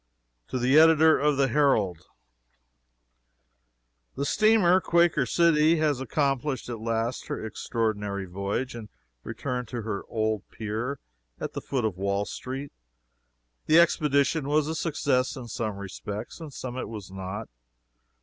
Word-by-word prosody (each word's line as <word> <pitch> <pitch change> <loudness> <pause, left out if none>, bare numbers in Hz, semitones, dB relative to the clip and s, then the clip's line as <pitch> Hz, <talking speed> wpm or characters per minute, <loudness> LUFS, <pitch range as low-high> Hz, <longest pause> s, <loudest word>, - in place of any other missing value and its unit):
TO - - -3
THE 130 +4 +5
EDITOR 160 0 +6
OF 150 -1 +2
THE 135 -1 +3
HERALD: 110 - +1 2.1
The 140 - -2
steamer 195 -2 +4
__Quaker 170 -7 +3
City__ 165 -1 +4
has 150 -4 +1
accomplished 135 -1 -1
at 115 -2 -5
last 115 +2 -2
her - - -4
extraordinary 105 -3 -2
voyage 100 +8 -3
and 115 -3 -8 0.3
returned 125 +2 -4
to 120 -1 -5
her 105 -2 -3
old 110 -2 0
pier 115 +6 -4 0.4
at - - -5
the - - -4
foot 130 -5 -2
of 100 -5 -2
Wall 100 +1 0
street. 135 +5 -6 1.0
The 160 +2 +6
expedition 150 -3 +2
was 150 0 +2
a 160 - -2
success 145 -5 0
in 125 -3 -8
some 110 -3 -3
respects, 100 - -7
in 160 -2 -7
some 125 -1 -6
it - - -4
was 105 -4 -8
not. 95 +3 -6
125 Hz, 140 wpm, -27 LUFS, 110-150 Hz, 2.1 s, EDITOR